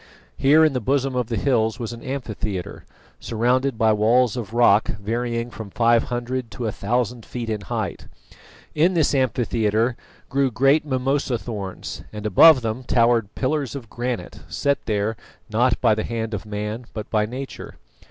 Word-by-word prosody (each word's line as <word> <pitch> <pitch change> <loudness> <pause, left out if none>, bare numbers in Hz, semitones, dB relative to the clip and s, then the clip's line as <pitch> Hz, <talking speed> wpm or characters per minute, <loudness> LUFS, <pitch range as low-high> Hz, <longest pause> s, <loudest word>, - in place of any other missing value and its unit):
Here 150 +4 +5
in 155 - +2
the 125 - 0
bosom 135 +2 0
of 125 -3 0
the 115 -2 -2
hills 110 -2 +1
was 120 -2 -5
an 115 - -10
amphitheatre, 110 -8 -5 0.3
surrounded 125 +3 0
by 110 -1 +4
walls 115 +3 +3
of 115 -5 -5
rock 115 -3 +4
varying 115 +3 -3
from 110 -3 -8
five 115 +2 +3
hundred 120 0 -3
to 120 - -4
a 110 - 0
thousand 120 +3 -1
feet 115 -1 -5
in 105 -1 -2
height. 95 - -4 0.7
In 170 +4 +3
this 160 -4 +2
amphitheatre 115 -3 +1 0.3
grew 135 -1 +1
great 135 +6 +3
mimosa 130 -1 0
thorns, 105 -5 -6
and 105 0 -7
above 130 - +7
them 115 +2 -3
towered 115 -3 +2
pillars 140 -1 -1
of 120 -6 -8
granite, 120 -10 -4
set 140 - 0
there 105 0 0 0.4
not 120 +3 +2
by - - +4
the 110 0 -1
hand 115 -1 -3
of 105 +1 -5
man 105 +3 -4
but 110 - -5
by 105 -2 +2
nature. 130 +4 -7
120 Hz, 165 wpm, -23 LUFS, 110-130 Hz, 0.7 s, above